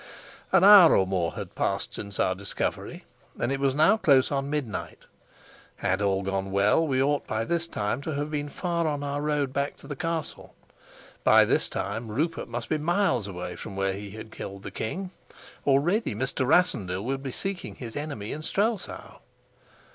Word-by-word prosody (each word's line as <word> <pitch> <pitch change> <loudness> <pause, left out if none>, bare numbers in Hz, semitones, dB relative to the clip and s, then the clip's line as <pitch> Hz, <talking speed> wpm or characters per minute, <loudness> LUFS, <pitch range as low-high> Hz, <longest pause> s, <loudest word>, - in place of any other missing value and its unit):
An 190 -1 +5
hour 200 -4 +9
or 95 - +3
more 90 -3 -1
had - - -6
passed - - -2
since 100 -2 -6
our 95 - +3
discovery, 100 +1 -4 0.4
and 125 - 0
it 135 - -1
was 135 -1 +1
now 160 +9 +5
close 140 -9 +4
on 140 0 -1
midnight. 145 -7 -3 0.8
Had 95 +2 -1
all 100 -1 +1
gone 95 0 -2
well 100 +11 +3
we 130 -2 +1
ought 145 +1 0
by 110 +1 -1
this 170 +4 -1
time 105 -1 -2
to 155 0 -4
have 145 +2 -3
been 145 -1 -2
far 170 +1 -1
on 145 -1 -2
our 145 0 -2
road 145 -3 0
back 140 +1 -2
to - - -15
the 145 - -5
castle; 165 +2 -4 0.7
by - - +7
this - - +1
time 110 +4 -3
Rupert 155 +10 -2
must 115 -1 -5
be 155 - 0
miles 155 - +1
away 90 -3 -6
from 100 - -8
where 95 0 0
he 100 +1 -7
had 110 +2 -9
killed 100 -2 -8
the - - -6
king; 180 - -4 0.6
already 145 - +2
Mr. 130 +2 -1
Rassendyll 105 - +2
would 135 +1 -2
be 135 -1 -5
seeking 195 +6 -5
his 115 -3 -8
enemy 145 -8 -4
in 155 - -5
Strelsau. 205 +5 -2
135 Hz, 185 wpm, -27 LUFS, 105-155 Hz, 0.8 s, hour